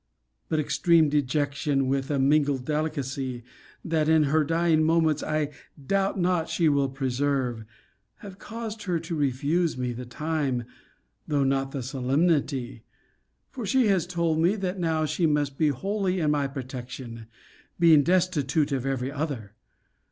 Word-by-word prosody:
But 155 Hz, -, +1 dB
extreme 160 Hz, +1 st, +3 dB
dejection, 140 Hz, -1 st, 0 dB
with 135 Hz, 0 st, -1 dB
a 145 Hz, -, 0 dB
mingled 140 Hz, -1 st, +2 dB
delicacy, 140 Hz, -5 st, -3 dB, 0.4 s
that 160 Hz, -2 st, +1 dB
in 160 Hz, -1 st, +5 dB
her 155 Hz, +2 st, +2 dB
dying 165 Hz, 0 st, +2 dB
moments 160 Hz, -1 st, +2 dB
I 155 Hz, -1 st, -1 dB, 0.4 s
doubt 195 Hz, 0 st, +1 dB
not 175 Hz, -2 st, +1 dB
she 165 Hz, 0 st, +1 dB
will 140 Hz, -2 st, +2 dB
preserve, 130 Hz, -3 st, -1 dB, 0.5 s
have 195 Hz, -2 st, -12 dB
caused 225 Hz, -1 st, -6 dB
her 175 Hz, -3 st, 0 dB
to 165 Hz, +1 st, -5 dB
refuse 145 Hz, +3 st, 0 dB
me 125 Hz, -1 st, -2 dB
the 125 Hz, +1 st, -7 dB
time, 140 Hz, -2 st, -2 dB, 0.6 s
though 145 Hz, -3 st, +1 dB
not 135 Hz, 0 st, 0 dB
the 135 Hz, -2 st, -5 dB
solemnity; 135 Hz, -1 st, 0 dB, 0.7 s
for 255 Hz, -, -6 dB
she 225 Hz, +3 st, +2 dB
has 180 Hz, -4 st, +2 dB
told 170 Hz, -3 st, 0 dB
me, 175 Hz, +5 st, +3 dB
that 190 Hz, -2 st, -3 dB
now 160 Hz, -2 st, 0 dB
she 165 Hz, +2 st, +1 dB
must 145 Hz, -2 st, 0 dB
be 155 Hz, +2 st, +2 dB
wholly 190 Hz, -, -1 dB
in 155 Hz, -3 st, +2 dB
my 145 Hz, -2 st, +1 dB
protection 125 Hz, -3 st, -7 dB, 0.5 s
[being 165 Hz, -3 st, +7 dB
destitute 160 Hz, -4 st, +1 dB
of 135 Hz, -1 st, -1 dB
every 135 Hz, -1 st, -2 dB
other! 140 Hz, -9 st, -4 dB
150 Hz, 145 wpm, -26 LUFS, 135-165 Hz, 0.7 s, being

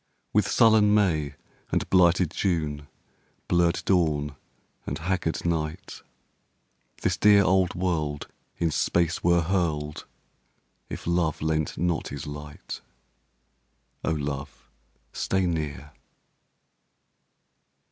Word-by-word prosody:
With 100 Hz, -1 st, +3 dB
sullen 110 Hz, -3 st, +5 dB
May 80 Hz, -9 st, +1 dB, 0.4 s
and -, -, 0 dB
blighted 90 Hz, -2 st, +4 dB
June, 75 Hz, -7 st, -1 dB, 0.6 s
Blurred 85 Hz, 0 st, +2 dB
dawn 75 Hz, -6 st, +1 dB, 0.5 s
and -, -, -2 dB
haggard 85 Hz, -1 st, -2 dB
night, 80 Hz, -2 st, -3 dB, 1.0 s
This 90 Hz, -, +1 dB
dear 105 Hz, 0 st, +6 dB
old 95 Hz, 0 st, +2 dB
world 80 Hz, -5 st, -1 dB, 0.3 s
in 85 Hz, -2 st, 0 dB
space 85 Hz, +2 st, +1 dB
were 85 Hz, 0 st, +4 dB
hurled 80 Hz, -5 st, -1 dB, 0.8 s
If -, -, -7 dB
love 85 Hz, -2 st, +1 dB
lent 80 Hz, -1 st, -1 dB
not 85 Hz, 0 st, 0 dB
his 70 Hz, +2 st, -6 dB
light. 75 Hz, 0 st, -8 dB, 1.2 s
(O -, -, 0 dB
love, 70 Hz, -5 st, -4 dB, 0.5 s
stay 95 Hz, -1 st, 0 dB
near!) 75 Hz, -4 st, -3 dB
85 Hz, 95 wpm, -26 LUFS, 75-90 Hz, 1.2 s, dear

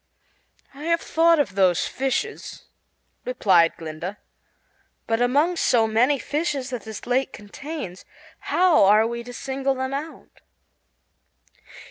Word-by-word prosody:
"I 285 Hz, +3 st, -9 dB
have 335 Hz, 0 st, +2 dB
thought 330 Hz, +1 st, +3 dB
of 285 Hz, -10 st, 0 dB
those 185 Hz, -3 st, +2 dB
fishes," 270 Hz, -1 st, -3 dB, 0.6 s
replied 190 Hz, -9 st, +3 dB
Glinda, 165 Hz, +5 st, -6 dB, 0.9 s
"but 225 Hz, +1 st, 0 dB
among 290 Hz, +8 st, +2 dB
so 235 Hz, -7 st, +3 dB
many 240 Hz, +6 st, +2 dB
fishes 285 Hz, -2 st, -3 dB
as 245 Hz, -, -5 dB
this 220 Hz, -1 st, -8 dB
lake 260 Hz, +2 st, 0 dB
contains 210 Hz, -, -8 dB, 0.4 s
how 355 Hz, -, +3 dB
are 210 Hz, +3 st, +5 dB
we 235 Hz, +1 st, -3 dB
to 245 Hz, -, -9 dB
single 270 Hz, +2 st, -2 dB
them 260 Hz, +1 st, -3 dB
out?" 300 Hz, +4 st, -8 dB
255 Hz, 120 wpm, -23 LUFS, 215-290 Hz, 0.9 s, are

